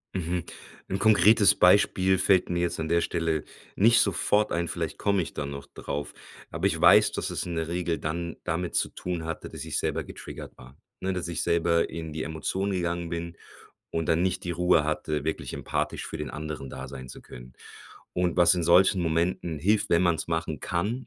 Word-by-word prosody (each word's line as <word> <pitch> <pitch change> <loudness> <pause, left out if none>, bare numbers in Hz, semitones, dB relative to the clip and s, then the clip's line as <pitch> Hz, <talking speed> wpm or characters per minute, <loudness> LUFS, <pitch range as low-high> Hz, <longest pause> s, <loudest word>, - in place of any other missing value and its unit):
Mhm. 90 -1 -2 0.4
'N 95 - -2
konkretes 105 0 +5
Beispiel 95 0 +4
fällt 95 -1 +3
mir 85 0 0
jetzt 85 - -1
an 80 - -2
der 85 +1 +2
Stelle 80 -3 -1 0.3
nicht 115 +4 +5
sofort 105 +1 +2
ein. 85 0 -1
Vielleicht - - -4
komme 100 -2 +1
ich 80 - -6
da 70 - -4
noch 70 0 -7
drauf, 70 +1 -5 0.4
aber - - -3
ich - - +1
weiß, - - +7
dass - - -3
es - - -3
in 85 - -4
der 80 -1 -2
Regel 85 -2 -2
dann 85 +2 -3
damit 85 +1 -2
zu - - +1
tun 90 -3 -5
hatte, 80 0 -5
dass - - -7
ich - - -2
selber - - -1
getriggert - - -10
war. 65 +2 -14 0.3
Ne, 95 0 -1
dass 90 -1 -3
ich 85 -3 -2
selber 85 0 +2
in 80 -1 -6
die 80 +1 -4
Emotionen 95 +6 -2
gegangen 85 -1 -2
bin 85 0 -5 0.5
und 80 -1 -2
dann 80 +2 +3
nicht 95 0 -1
die 85 - -2
Ruhe 85 -2 +3
hatte, 75 -1 -2
wirklich 80 - -3
empathisch - - -3
für - - -6
den - - -4
anderen 75 -3 -6
da 65 0 -7
sein 65 -1 -9
zu - - -10
können. - - -12 0.6
Und 90 -1 0
was 90 +1 +6
in 90 - -1
solchen 90 +3 +5
Momenten 85 -1 -1
hilft, 100 +7 +2
wenn 85 +1 +4
man's 85 -3 +1
machen 80 -2 -2
kann 105 +9 -2
85 Hz, 200 wpm, -27 LUFS, 80-90 Hz, 0.6 s, weiß